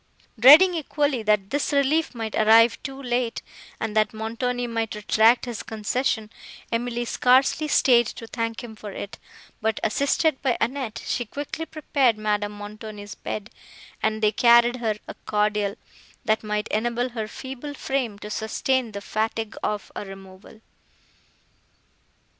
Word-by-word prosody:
Dreading 305 +10 +9
equally, 290 -5 0
that 210 -2 +1
this 285 +1 0
relief 285 +1 +1
might 225 -2 -4
arrive 225 +2 +5
too 270 0 -7
late, 245 -2 -2 0.4
and 220 -1 -3
that 215 +2 +2
Montoni 245 +3 -2
might 225 -2 -2
retract 220 +3 +3
his 240 -3 -5
concession, 220 0 -2 0.4
Emily 240 +1 -1
scarcely 260 +6 +3
staid 240 -5 +4
to 230 - -8
thank 230 0 -4
him 225 -2 -9
for 210 -1 -8
it, 200 +1 -7 0.4
but, 220 0 0
assisted 280 +5 +1
by 255 -4 +1
Annette, 245 -2 -2
she 245 - -1
quickly 290 +7 -6
prepared 275 -7 +1
Madame 210 -1 -1
Montoni's 205 0 -8
bed, 215 0 -6 0.5
and 220 0 -1
they 210 - +5
carried 235 +2 +5
her 225 -3 -1
a - - -6
cordial, 210 -1 0 0.5
that 215 0 +1
might 210 0 -2
enable 240 +3 0
her 225 -3 -4
feeble 270 +5 -7
frame 260 -7 -2
to 210 +1 -8
sustain 230 +2 -1
the 200 - -5
fatigue 220 +1 -2
of 210 -1 -3
a - - -4
removal. 195 +2 -13
230 Hz, 140 wpm, -24 LUFS, 215-255 Hz, 0.5 s, Dreading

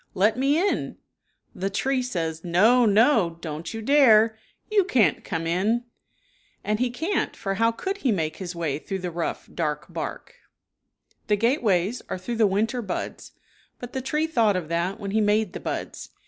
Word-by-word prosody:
Let 210 +4 +3
me 275 +4 +2
in," 395 +4 -1 0.6
the 195 +2 -2
tree 260 +6 0
says, 165 -10 -3
"No! 220 +8 +4
No! 210 - +3
Don't 160 0 -6
you 225 0 -6
dare! 225 -5 +5 0.4
You 415 -2 +4
can't 230 - +2
come 165 0 -3
in," 200 +8 +1 0.8
and 210 0 -1
he 250 0 +1
can't, 320 +11 -2
for 195 -2 -3
how 230 +3 +2
could 385 - -4
he 270 - +1
make 160 -6 -1
his 180 -2 -6
way 155 -4 -2
through 195 +4 -4
the 180 -1 -4
rough, 170 0 -4
dark 150 -4 -2
bark.i* - - -6 0.9
Winter 210 - +5
bld. - - -6
^he - - -11
gateways 225 - +1
are - - -2
through 225 +6 -5
the 220 -2 +4
winter 220 +5 0
buds, 190 -5 -5 0.4
but 245 0 -9
the 265 - -2
tree 300 +4 0
thought 230 -10 +2
of 175 -4 -3
that 175 +5 -1
when 200 -2 -4
he 220 +2 +2
made 210 -1 +1
the - - -5
buds. - - -5
215 Hz, 185 wpm, -25 LUFS, 180-245 Hz, 0.9 s, dare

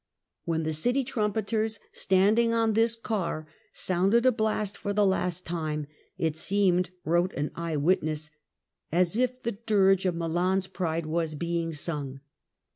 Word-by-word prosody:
When 165 -1 0
the 160 0 -1
city 245 - +1
trumpeters, 220 -2 -1
standing 215 +5 +3
on 225 -1 +2
this 225 +1 +3
car, 195 -9 -3 0.3
sounded 195 +7 +2
a 255 - +7
blast 215 -3 -1
for 205 - -3
the 205 0 +3
last 180 -2 0
time, 155 -3 -2 0.3
it 160 -1 -1
seemed, 180 -2 +2 0.2
wrote 175 +3 +2
an 145 +1 -2
eye 165 -2 -3
witness, 155 -1 0 0.6
as 175 +3 +2
if 255 +1 0
the 235 - 0
dirge 195 -3 +2
of 180 - 0
Milan's 175 +3 0
pride 170 -4 -2
were 165 +1 0
being 170 0 -1
sung. 145 -3 -4
185 Hz, 145 wpm, -28 LUFS, 165-215 Hz, 0.6 s, a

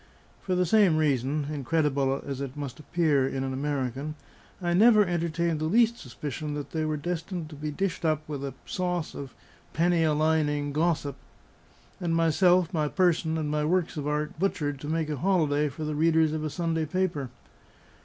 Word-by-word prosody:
For 185 - -1
the 180 0 +2
same 190 -3 +4
reason 145 -1 +1
(incredible 140 -1 0
as 140 -1 -4
it 140 0 -5
must 145 0 -6
appear 150 -4 +1
in 135 0 -2
an 135 0 -2
American) 140 +1 -2 0.4
I 175 -2 0
never 215 +2 +6
entertained 170 -2 -1
the 155 - -1
least 230 +7 +3
suspicion 145 +4 -5
that 145 -1 -6
they 160 -1 -1
were 155 -1 -1
destined 170 +1 -4
to - - -8
be 150 +1 -4
dished 180 +4 -2
up 155 -1 0
with 145 -2 -5
a 135 -2 -5
sauce 180 -3 -2
of 140 -2 -8 0.4
penny 170 0 +2
a 155 -1 +3
lining 150 -2 +1
gossip; 150 -3 0 0.8
and 170 -3 0
myself, 175 +2 +3
my 155 -3 +1
person, 165 -2 +1
and 150 -2 -2
my 150 0 0
works 175 +2 +1
of 145 -2 -3
art 150 +1 -2
butchered 145 -7 -1
to 145 - -7
make 160 0 0
a 150 - -2
holiday 150 -3 +2
for 145 +3 -7
the 155 0 -2
readers 160 0 +3
of 155 -1 -2
a 155 - -1
Sunday 165 0 -1
paper. 165 -6 -1
155 Hz, 185 wpm, -27 LUFS, 145-170 Hz, 0.8 s, never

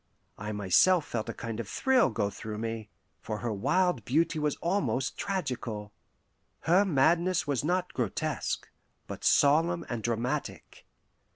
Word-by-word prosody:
I 105 +1 -4
myself 105 - +4
felt 110 -2 -4
a - - -3
kind 115 -1 -5
of 110 -3 -5
thrill 265 -2 +3
go 100 -2 -1
through 105 +1 -6
me, 115 -1 -4 0.3
for 110 -1 -4
her 115 0 -3
wild 180 - +1
beauty 155 +7 +1
was 150 -1 0
almost 140 - -1
tragical. 120 - -3 0.7
Her 180 +4 +4
madness 170 +2 +2
was 140 -3 -1
not 180 +3 0
grotesque, 120 -7 -2 0.4
but - - -8
solemn 165 +4 +3
and 120 -2 -3
dramatic. 120 +6 -3
130 Hz, 135 wpm, -29 LUFS, 110-170 Hz, 0.7 s, myself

